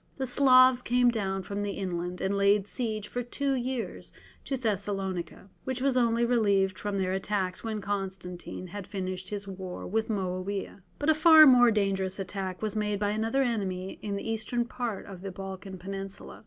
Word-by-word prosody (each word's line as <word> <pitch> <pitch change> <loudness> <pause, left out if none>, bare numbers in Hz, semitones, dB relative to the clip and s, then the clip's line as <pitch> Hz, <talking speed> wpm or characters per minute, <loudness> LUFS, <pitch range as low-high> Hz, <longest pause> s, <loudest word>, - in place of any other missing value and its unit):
The 265 - -1
Slavs 255 -1 +6
came 245 0 +3
down 195 -4 -2
from 200 +2 -4
the 205 -1 -2
inland, 180 -2 -4
and 195 +1 0
laid 200 0 +3
siege 215 -3 -3
for 245 - -3
two 275 +3 -1
years 255 -2 -3 0.3
to 270 - -2
Thessalonica, 195 -6 -3 0.2
which 260 -1 -3
was 265 0 +1
only 235 -1 +3
relieved 200 -5 +2
from 205 -1 -2
their 185 -1 0
attacks 190 -1 -2
when 220 -2 -3
Constantine 190 -3 -5
had 190 +1 -7
finished 185 -2 -4
his 205 -1 -5
war 185 -2 -6
with 220 +3 -1
Moawiah. 195 0 -3 0.2
But 290 - 0
a - - +7
far 315 0 +8
more 245 -3 +7
dangerous 195 -3 0
attack 190 0 -4
was 215 -1 -1
made 210 -1 0
by 205 0 +1
another 225 +5 +1
enemy 195 -6 -2
in 205 -1 -3
the 200 - -5
eastern 225 +2 -1
part 235 -4 -4
of 190 -3 -10
the 195 - -5
Balkan 190 0 -7
Peninsula. 195 +2 -7
205 Hz, 180 wpm, -28 LUFS, 190-235 Hz, 0.3 s, far